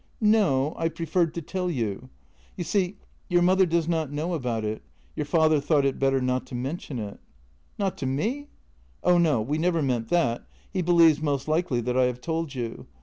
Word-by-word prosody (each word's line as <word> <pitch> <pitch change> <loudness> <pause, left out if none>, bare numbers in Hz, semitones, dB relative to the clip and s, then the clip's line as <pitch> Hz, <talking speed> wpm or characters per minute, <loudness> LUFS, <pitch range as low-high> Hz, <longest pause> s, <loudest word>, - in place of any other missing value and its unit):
"No; 190 - +3
I 165 - +1
preferred 165 +1 0
to 170 - -4
tell 180 +3 -2
you. 120 - -3 0.5
You 175 - -2
see, 190 +2 0 0.3
your 175 -1 +3
mother 185 +1 +4
does 165 -1 +1
not 160 -4 -1
know 155 +5 -2
about 120 -8 -2
it; 105 +1 -3 0.3
your - - -3
father 155 -1 +3
thought 145 0 +2
it 135 - 0
better 135 0 +2
not 125 0 -1
to 125 - -7
men 135 +8 -3
tion 135 - -7
it." 105 -3 -6 0.3
" 60 -1 -36
Not 195 -2 -2
to 135 - -2
me? 225 - -2 0.2
" - - -34
" - - -34
Oh 180 -1 +4
no, 150 -10 +3
we 145 +7 -2
never 170 -1 +1
meant 120 -4 -1
that. 125 -10 +1 0.3
He 185 - 0
believes 165 -3 +5
most 145 -2 -1
likely 155 -6 +1
that 125 +1 -2
I 130 - +5
have 125 0 -2
told 160 0 -3
you. 120 -3 -5
155 Hz, 210 wpm, -26 LUFS, 125-170 Hz, 0.5 s, believes